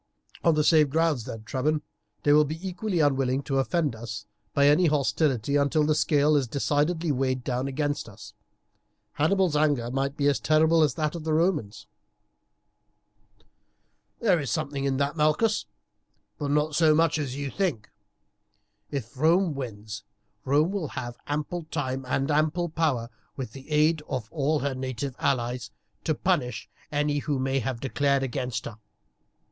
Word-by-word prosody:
"On 165 -2 +4
the 150 - +2
same 155 -1 +5
grounds 155 -5 +1
then, 110 -1 -7
Trebon, 150 +6 -1 0.4
they 145 - +5
will 150 +1 +6
be 160 +6 -5
equally 180 -1 -1
unwilling 135 -2 +1
to 135 -1 0
offend 150 -2 0
us 110 -1 -7 0.3
by 140 - +3
any 150 +5 +5
hostility 140 -3 +1
until 145 +2 +2
the 155 - +3
scale 150 0 +3
is 140 -3 +2
decidedly 150 +5 0
weighed 130 -1 0
down 130 +1 -1
against 145 -2 -2
us. 105 0 -12 0.8
Hannibal's 175 +1 +2
anger 145 -6 +1
might 135 +2 -1
be 145 - 0
as 145 - +2
terrible 160 +1 +4
as 150 - +2
that 155 -2 -1
of 170 -2 -6
the 160 0 -1
Romans." 150 - 0 2.3
"There 190 -7 +3
is 140 -4 -3
something 140 0 -2
in 135 -1 0
that, 140 +2 0
Malchus, 155 +8 +2 0.7
but 145 -2 -2
not 150 +1 +1
so 155 0 +4
much 165 -1 +2
as 135 -3 -3
you 140 -1 -4
think. 165 - -1 1.0
If 135 -4 -5
Rome 165 +5 +3
wins, 110 -5 -6 0.4
Rome 150 +6 +3
will 195 -6 -2
have 120 -3 -6
ample 150 +3 -3
time 135 -4 -3
and 135 +3 0
ample 155 +4 +1
power, 145 -8 -1 0.3
with 130 -5 -5
the 135 +4 -12
aid 155 +1 +3
of 125 -5 -4
all 155 0 +1
her 140 -1 -1
native 130 0 -4
allies, 125 -1 -1 0.4
to - - +1
punish 125 -2 -1 0.2
any 145 0 +1
who 145 0 -1
may 135 +1 0
have 125 -1 -3
declared 140 +1 +1
against 125 -3 -3
her. 110 -2 -8
145 Hz, 160 wpm, -26 LUFS, 130-155 Hz, 2.3 s, will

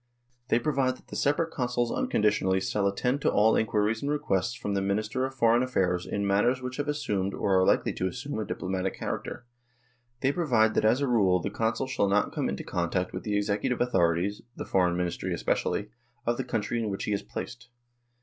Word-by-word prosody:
They - - +3
provide 130 -2 0
that - - -23
the - - -7
separate 160 +4 +1
Consuls 120 -3 -1
un - - -1
conditionally 105 -3 +2
shall 100 +1 0
attend 125 +8 0
to - - +3
all 110 +2 +4
inquiries 110 0 +1
and 140 - -2
requests 120 -6 0
from 105 -4 -3
the 100 - 0
Minister 110 +6 -1
of 135 - -11
Foreign 115 -1 +4
Affairs 90 -8 0
in 100 0 -2
matters 105 +6 +2
which 125 0 -6
have 145 0 -2
assumed 100 -10 -1
or 95 -2 +2
are - - +4
likely - - +2
to 95 - -1
assume 125 +4 -5
a - - -1
diplomatic 95 -1 -3
character; 120 - -5 0.8
they 135 - +3
provide 120 -10 +2
that - - +1
as 120 +5 +3
a 140 - +1
rule 100 -7 +3
a - - 0
Consul 115 +3 -1
shall 130 -6 0
not 100 +1 +1
come - - -1
into 70 - -4
contact 90 +1 -2
with 90 - -4
the 105 -1 -1
executive 105 +5 0
authorities 90 -4 +1
the - - -6
Foreign 90 -2 +2
Ministry 90 -1 -2
especially 105 +1 -1 0.3
of 120 0 +1
the - - -1
country 110 +2 -2
in 110 -2 -1
which 95 - -3
he 105 - -1
is 100 - -1
placed. 120 +1 -7
110 Hz, 205 wpm, -28 LUFS, 95-125 Hz, 0.8 s, all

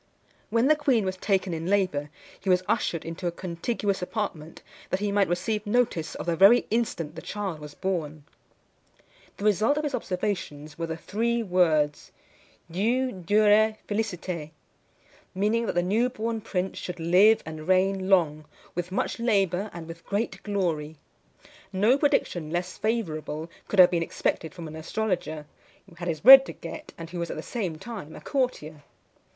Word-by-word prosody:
When 230 +3 +2
the 310 - +6
queen 270 -8 +2
was 185 0 -2
taken 190 -1 0
in 165 +1 -4
labour, 180 -7 +1 0.3
he 190 - -4
was 180 0 +4
ushered 165 - 0
into 165 +2 -4
a - - 0
contiguous 190 +4 -2
apartment, 180 -5 -4 0.3
that 185 - 0
he 205 0 -1
might 200 -1 +3
receive 205 +5 -1
notice 215 -8 0
of - - -5
the 170 -1 0
very 200 +8 +6
instant 195 -9 -1
the 165 - -8
child 200 -6 -4
was 150 -1 -10
born. 160 -6 -3 1.1
The 200 - -5
result 215 +7 +3
of 300 - -1
his 295 -2 -2
observations 180 - -3
were 165 +1 -4
the 160 0 -4
three 230 +6 -1
words, 160 -6 +1 0.6
diu, 240 +8 +1
durè, 215 +3 +4
feliciter; 180 -7 -3 0.9
meaning, 215 +4 +1
that - - -2
the 175 - +2
new 220 +7 +2
born 230 -2 -3
prince 190 -3 -3
should 180 -1 -6
live 185 +7 +5
and 155 0 -8
reign 190 +1 +2
long, 155 -5 +3 0.3
with 175 +1 -4
much 195 - -2
labour, 200 -4 +1
and 170 -2 -8
with 165 0 -10
great 205 +3 -2
glory. 165 -7 -2 0.8
No 210 +6 +4
prediction 275 - 0
less 175 +2 -3
favourable 165 -7 -3 0.2
could 205 - -3
have 180 -1 +8
been 170 -2 +1
expected 160 -1 -2
from 170 -3 -7
an 155 - -9
astrologer, 160 -3 -3 0.4
who 185 - -17
had 175 +1 -7
his 160 -3 -2
bread 265 +3 +11
to - - -6
get, 305 - -9
and 165 0 -8
who 175 - -5
was 170 -1 -3
at - - -5
the 155 - -5
same 190 -10 -3
time 195 -6 -8
a - - -9
courtier. 205 - -2
185 Hz, 170 wpm, -26 LUFS, 165-215 Hz, 1.1 s, bread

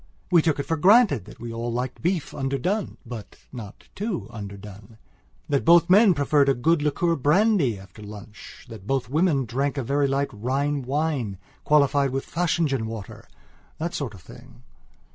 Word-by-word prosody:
We 170 -2 +6
took 160 -2 +1
for 165 - -1
granted 190 - +5
that - - -14
we 115 0 -6
all 120 +1 -3
liked 125 +2 -4
beef 170 -5 -1
underdone 140 - -2
but 115 -3 -8 0.2
not 110 -5 -9
too 205 -3 -3
underdone; 100 0 -10 0.5
that 140 - 0
both 170 +1 +5
men 200 -1 +6
preferred 145 0 +3
a 135 - +3
good 160 +6 +2
liqueur 165 +3 +1
brandy 150 - +2
after 95 +2 -14
lunch; 105 0 -11
that 110 -5 -11
both 135 -3 -1
women 155 -4 +2
drank 135 +5 -2
a 135 - -1
very 140 +3 +1
light 135 +1 0
Rhine 135 +6 -1
wine 135 -6 -2 0.3
qualified 140 -2 +3
with 135 +1 -3
Fachingen 160 -8 0
waterthat 110 - -9
sort 125 -8 -4
of 95 - -14
thing. 125 0 -15
135 Hz, 160 wpm, -24 LUFS, 115-160 Hz, 0.5 s, We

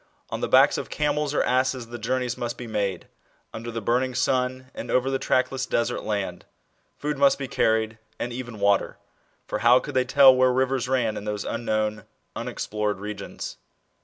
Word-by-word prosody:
On - - -3
the - - 0
Lacks - - +5
of - - -6
camels 150 -1 0
or 150 - +1
asses 130 -1 0
the 120 0 -7
journeys 125 +2 -1
must 120 -1 -4
be 125 - -7
made, 100 -5 -2 0.5
under 115 +1 -6
the 115 -1 -5
burning 125 +3 +1
sun 130 0 0
and - - -7
over 130 +1 +2
the 135 - 0
track 130 - +1
less 130 -1 -3
desert 120 0 0
land: 100 -4 -3 0.5
food 150 -1 -3
must 140 -1 +5
be 135 - -4
carried, 110 -1 +1 0.2
and 120 - -4
even 120 -3 -7
water; 100 0 +2 0.5
for - - -3
how 120 +2 +6
could 145 - -7
they 130 -1 +3
tell 135 0 +7
where 130 0 +4
rivers 130 -1 0
ran 120 -5 +1
in 105 - -6
those 105 -1 -3
unknown, 110 -2 -1 0.3
unexplored 105 -2 -3
regions 105 -1 -6
120 Hz, 185 wpm, -25 LUFS, 110-130 Hz, 0.5 s, tell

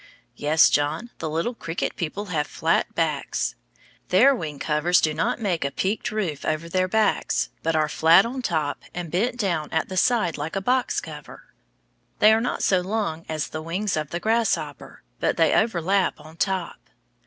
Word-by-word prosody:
Yes, 155 +2 +4
John, 155 +11 0
the 160 - -3
little 165 +10 -1
cricket 165 -6 -4
people 180 +5 -4
have 150 -2 0
flat - - 0
backs. - - -1 0.6
Their 250 +10 +6
wing 155 - -5
covers 155 +5 +2
do 155 - +1
not 160 +9 -1
make 185 -8 -1
a 140 - 0
peaked 195 +9 -2
roof 185 -9 -3
over 155 +2 -2
their 185 +2 +1
backs, 215 +1 +1
but 165 0 0
are 155 -1 +2
flat 165 +5 +5
on 255 +3 -4
top 155 -10 -1
and 175 -3 -5
bent 235 +8 0
down 175 -9 -1
at 160 - -1
the 185 - -5
sides 185 -8 +2
like 150 +5 -4
a - - +1
box 250 +6 +1
cover. - - -11 0.6
They 215 +1 +6
are 220 - +2
not 245 - -2
so 185 - +3
long 185 -4 -3
as 155 -1 -2
the 155 - -5
wings 185 +5 -2
of 155 -2 -3
the 170 - -3
grasshopper, 185 - -1 0.2
but - - 0
they 165 -2 +4
overlap 195 -3 +1
on 155 +1 -13
top. 190 -2 -1
175 Hz, 180 wpm, -24 LUFS, 155-210 Hz, 0.6 s, Their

